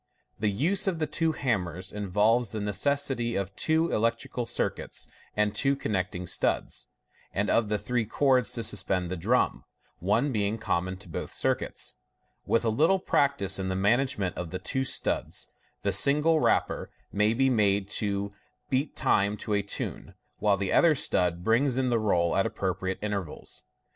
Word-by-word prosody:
The 105 0 +1
use 180 - +1
of 185 -3 +1
the 160 - 0
twe 160 +2 0
hammers 95 - -1
involves 105 +3 +1
the 110 - -2
necessity 120 +4 0
of 100 0 -3
two 160 +1 +1
electrical 115 +2 -1
circuits - - -2 0.3
and 105 -1 +2
two 135 0 +2
connecting 90 -7 -2
studs, - - -1 0.4
and 100 +1 0
of 115 -3 +2
three 120 0 -1
cords 130 -3 +2
to 115 - -2
suspend 90 -5 0
the - - -1
drum 110 +9 +1 0.4
(one 110 - +1
being 105 -1 0
common 95 -3 -1
to 95 - -14
both 80 - -5
circuits). - - -1 0.5
With 115 - +2
a - - +3
little 160 - +3
practice 140 - +1
in 95 0 -2
the 95 - -1
management 105 -2 +1
of 90 -2 -4
the 95 - -4
two 130 +8 -2
studs, - - -1 0.4
the - - +1
single 150 +3 +4
rapper - - +1 0.2
may 105 +2 +2
be 135 +2 +3
made 100 -4 +2
to 100 -1 -1 0.4
beat 135 +3 0
time 100 +1 +2
to 105 - -3
a 100 - +2
tune, 100 - -5 0.2
while 105 -2 +3
the 95 0 -1
other 165 -3 +5
stud 90 -8 +1
brings 120 +5 +2
in 130 -1 +1
the 115 - +2
roll 85 -6 +2
at - - +2
appropriate 95 0 -2
intervals. 100 -7 -4
105 Hz, 165 wpm, -28 LUFS, 95-130 Hz, 0.5 s, other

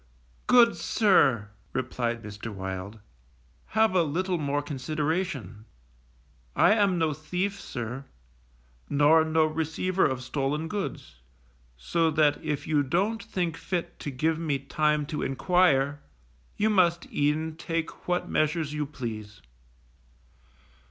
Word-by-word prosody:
Good 240 -2 +7
sir_, 145 - +2 0.2
replied 120 -2 -2
Mr. 105 +1 -7
Wild, 95 +1 -6 0.8
_have 220 -2 +4
a 185 - +4
little 175 +3 -1
more 145 0 -1
consideration. 145 - -3 0.9
I - - +5
am 200 -4 +3
no 160 -2 +1
thief, 180 +7 -3
sir, 120 +2 -5 0.8
nor 150 +3 +5
no 160 0 +2
receiver 160 +4 -1
of 130 -1 -3
stolen 145 +4 -2
goods, 195 - -5 0.6
so 165 - +1
that 150 -1 +2
if 150 -3 -2
you 150 -2 +2
don't 195 +11 0
think 180 -6 -2
fit 175 -1 -4
to - - -4
give 155 +4 0
me 155 -4 0
time 150 +2 0
to 150 +1 -4
enquire, 145 -2 +2 0.6
you 215 +1 +2
must 170 -4 +3
e'en 155 +2 0
take 165 0 -4
what 180 0 0
measures 155 -1 0
you 150 -1 -2
please. 110 -7 -7
155 Hz, 120 wpm, -27 LUFS, 135-175 Hz, 0.9 s, Good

